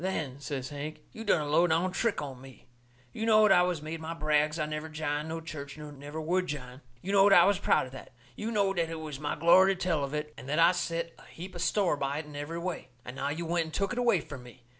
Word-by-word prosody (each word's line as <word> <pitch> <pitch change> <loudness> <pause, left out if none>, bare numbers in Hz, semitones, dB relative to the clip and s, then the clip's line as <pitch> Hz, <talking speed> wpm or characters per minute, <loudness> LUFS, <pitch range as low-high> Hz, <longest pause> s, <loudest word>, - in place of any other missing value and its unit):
"Then," 155 -8 -3
says 135 -2 -4
Hank, 150 +1 -6
"you 225 - -8
done 175 - +3
a 150 - -3
low 165 +4 +4
down 175 +3 +1
trick 215 -4 0
on 130 -3 -7
me. 135 -1 -14 0.5
You 220 - -4
knowed 215 -2 +6
I 180 - +6
has 170 -4 -2
made 160 +1 -5
my 160 +1 -5
brags 150 0 +1
I 155 - 0
never 155 +1 -5
jined 155 0 -3
no 165 0 -4
church 150 -3 -8
nor 150 -1 -8
never 145 +2 -8
would 180 +4 0
jine. 130 -3 -6 0.2
You 195 - -3
knowed 200 0 +6
I 175 -2 +8
was 200 -1 +3
proud - - +2
of 130 - -11
that. 130 - -10 0.2
You 215 - -4
knowed 200 -4 +1
that 165 -1 0
it 165 -1 -5
was 150 -3 -6
my 145 0 -2
glory 185 +5 +6
to - - -14
tell 165 -6 0
of 140 +2 -3
it, 150 0 -4
and 130 - -10
that 150 - 0
I 165 +1 +7
set 170 -2 -2
a - - -16
heap 180 +3 -9
of 175 - -6
store 185 -3 +2
by 140 +1 -2
it 155 - -4
in 150 -1 -11
every 145 +3 -5
way. 180 +2 -4 0.2
And 125 - -7
now - - -2
you've 165 +3 -3
went 170 0 +1
and 160 - -10
took 195 +3 0
it 245 - -2
away 235 -8 +3
from 140 -3 -9
me! 125 0 -15
160 Hz, 275 wpm, -29 LUFS, 145-180 Hz, 0.5 s, I